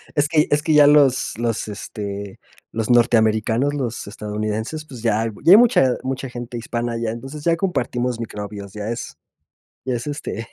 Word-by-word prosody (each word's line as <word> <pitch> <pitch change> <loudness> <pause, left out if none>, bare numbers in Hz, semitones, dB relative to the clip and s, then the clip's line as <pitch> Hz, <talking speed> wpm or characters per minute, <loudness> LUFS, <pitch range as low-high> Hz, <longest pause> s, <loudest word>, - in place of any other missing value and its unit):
Es 145 0 +2
que 155 -1 +2
es 145 - +3
que 155 0 +1
ya 145 -1 +7
los 140 -6 +4
los, 115 -2 -2
este, 100 -1 -6 0.3
los 110 +1 -2
norteamericanos, 115 +2 +3
los 120 -7 -4
estadounidenses, 110 +8 -4
pues, 125 -6 -10
ya 115 -1 +1
ya 170 - +7
hay - - +10
mucha 225 - +5
mucha 130 0 -3
gente 120 -1 -7
hispana 120 0 -3
allá, 115 -1 -2
entonces 135 +6 -8
ya 170 - +4
compartimos 125 -9 -1
microbios, 105 -3 -7
ya 105 0 -5
es 120 +1 -5 0.7
ya 130 - -1
es, 120 - -6
este, 115 -5 -5
120 Hz, 170 wpm, -21 LUFS, 110-145 Hz, 0.7 s, hay